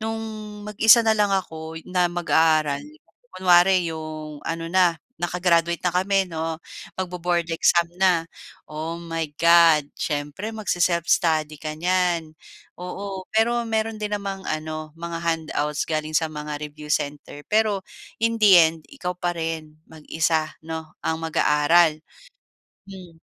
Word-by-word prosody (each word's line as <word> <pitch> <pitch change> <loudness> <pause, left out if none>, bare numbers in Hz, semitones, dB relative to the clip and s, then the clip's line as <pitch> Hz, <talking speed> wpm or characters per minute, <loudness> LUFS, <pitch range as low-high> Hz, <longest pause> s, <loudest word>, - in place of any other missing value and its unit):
no'ng 225 0 -3 0.4
mag-isa 215 +2 +6
na 220 - +4
lang 205 -1 +3
ako 160 -4 -3
na 180 -1 +2
mag-aaral, 160 -4 +2 0.6
kunwari 180 0 +5
'yong 155 -2 -7
ano 165 0 -3
na 180 -3 +4 0.2
naka-graduate 170 -1 +1
na 175 - +1
kami 190 +1 +2
'no, 160 0 -3 0.4
magbo-board 175 -2 -1
exam 170 +1 +3
na. 180 -3 +3 0.4
Oh 160 +2 -5
my 165 -2 -4
God, 170 -3 +5
siyempre 150 +8 -3
magse-self-study 170 -5 +1
ka 155 -1 -4
niyan. 175 -2 0 0.5
Oo, 190 +1 -6
pero 235 +2 +2
meron 220 0 -1
din 210 0 -3
namang 195 -2 -5
ano 155 0 -4
mga 170 0 -5
handouts 155 -2 -1
galing 155 -1 -2
sa 160 -1 +1
mga 150 -1 -5
review 150 0 -10
center. 145 0 -3
Pero 215 -2 +2 0.4
in 230 0 +2
the 210 - +6
end, 165 -1 +4
ikaw 180 0 -4
pa 175 0 -1
rin 160 -2 -4
mag-isa 160 0 -1
'no, 160 -1 -7
ang 160 0 -1
mag-aaral, 155 0 +3 0.9
hmm. 180 -4 -12
165 Hz, 130 wpm, -23 LUFS, 155-185 Hz, 0.9 s, mag-isa